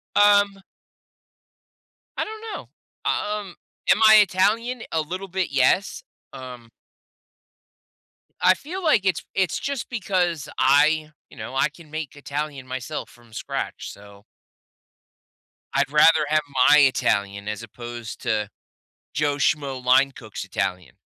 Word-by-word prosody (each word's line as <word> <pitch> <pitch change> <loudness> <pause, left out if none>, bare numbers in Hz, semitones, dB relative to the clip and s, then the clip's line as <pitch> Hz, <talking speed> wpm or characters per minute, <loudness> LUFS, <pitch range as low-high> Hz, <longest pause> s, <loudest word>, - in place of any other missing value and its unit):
Um 205 -1 +4 1.6
I - - 0
don't 435 0 -8
know, - - -8 0.4
um, 210 -3 -3 0.4
am - - +3
I 220 - +9
Italian? 215 +5 +3
A 160 - +1
little 185 +5 -6
bit, 190 0 -2
yes, 140 +8 +2 0.3
um 125 -3 -10 1.7
I 185 - +6
feel 350 - -7
like 300 - +3
it's 190 - 0
it's 190 -4 0
just 280 -4 -4
because 180 - -1
I, 150 +3 +3 0.2
you - - -17
know, 110 +4 -7
I 135 - +2
can 155 0 -17
make 155 -3 -5
Italian 145 -1 -5
myself 130 -1 -5
from 120 -2 -20
scratch. - - -5
So 100 0 -15 1.5
I'd 140 0 +1
rather 155 +1 +5
have 155 +1 +2 0.3
my 150 - +8
Italian 100 -7 +1
as 105 +2 -4
opposed 120 0 -8
to 105 -2 -1 0.6
Joe 145 0 0
Schmo 140 -2 0
line 135 +2 +4
cook's 110 -4 -8
Italian. 90 -8 -3
150 Hz, 125 wpm, -23 LUFS, 125-190 Hz, 1.7 s, I